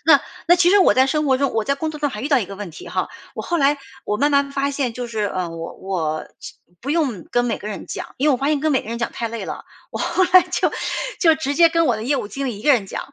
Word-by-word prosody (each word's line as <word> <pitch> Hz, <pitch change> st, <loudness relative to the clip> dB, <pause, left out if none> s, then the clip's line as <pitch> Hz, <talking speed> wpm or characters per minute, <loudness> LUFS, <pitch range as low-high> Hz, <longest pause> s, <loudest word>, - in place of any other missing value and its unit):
那 -, -, +7 dB, 0.3 s
那 350 Hz, -, +7 dB
其 350 Hz, 0 st, +4 dB
实 410 Hz, -, +6 dB
我 375 Hz, -, +5 dB
在 260 Hz, +1 st, +5 dB
生 305 Hz, +2 st, 0 dB
活 265 Hz, -2 st, +4 dB
中 275 Hz, 0 st, 0 dB
我 220 Hz, -1 st, 0 dB
在 280 Hz, -, +1 dB
工 315 Hz, +3 st, -3 dB
作 300 Hz, -, -8 dB
中 295 Hz, -, +1 dB
还 210 Hz, -, -6 dB
遇 285 Hz, -, -2 dB
到 280 Hz, -, +4 dB
一 215 Hz, -, -3 dB
个 200 Hz, -, -8 dB
问 205 Hz, -3 st, -6 dB
题 160 Hz, -, -11 dB
哈。 -, -, -2 dB, 0.3 s
我 -, -, -5 dB
后 345 Hz, -, -1 dB
来 285 Hz, 0 st, +3 dB, 0.3 s
我 210 Hz, -, 0 dB
慢 290 Hz, +4 st, +2 dB
慢 280 Hz, 0 st, +2 dB
发 280 Hz, 0 st, 0 dB
现 270 Hz, -4 st, -2 dB
就 245 Hz, 0 st, -4 dB
是， 225 Hz, -2 st, -4 dB
呃， 185 Hz, -3 st, -2 dB
我 165 Hz, 0 st, -7 dB
我 160 Hz, -5 st, -3 dB
其 -, -, -10 dB, 0.3 s
不 265 Hz, -, -8 dB
用 275 Hz, -, 0 dB
跟 245 Hz, 0 st, +2 dB
每 235 Hz, -, -1 dB
个 210 Hz, -, -7 dB
人 205 Hz, -, -6 dB
讲， -, -, -7 dB
因 295 Hz, +3 st, +2 dB
为 -, -, +5 dB
我 255 Hz, -, +2 dB
发 275 Hz, +3 st, 0 dB
现 305 Hz, -, +2 dB
跟 310 Hz, -1 st, +1 dB
每 260 Hz, -, +3 dB
个 -, -, -11 dB
人 230 Hz, -, -3 dB
讲 235 Hz, -, -2 dB
太 230 Hz, -, -3 dB
累 230 Hz, 0 st, -5 dB
了。 -, -, -6 dB, 0.3 s
我 -, -, -5 dB
后 370 Hz, +2 st, +1 dB
来 370 Hz, -, +10 dB
就 355 Hz, 0 st, 0 dB, 0.5 s
就 325 Hz, -3 st, +6 dB
直 300 Hz, -3 st, -2 dB
接 335 Hz, +1 st, +6 dB
跟 330 Hz, 0 st, +2 dB
我 235 Hz, -, +2 dB
的 215 Hz, -, -6 dB
业 275 Hz, +5 st, +1 dB
务 -, -, -3 dB
经 275 Hz, +3 st, -4 dB
理 235 Hz, -6 st, -4 dB
一 210 Hz, -, -11 dB
个 290 Hz, -, +5 dB
人 215 Hz, -6 st, +1 dB
讲， 275 Hz, -, -7 dB
275 Hz, 340 characters per minute, -21 LUFS, 220-300 Hz, 0.5 s, 来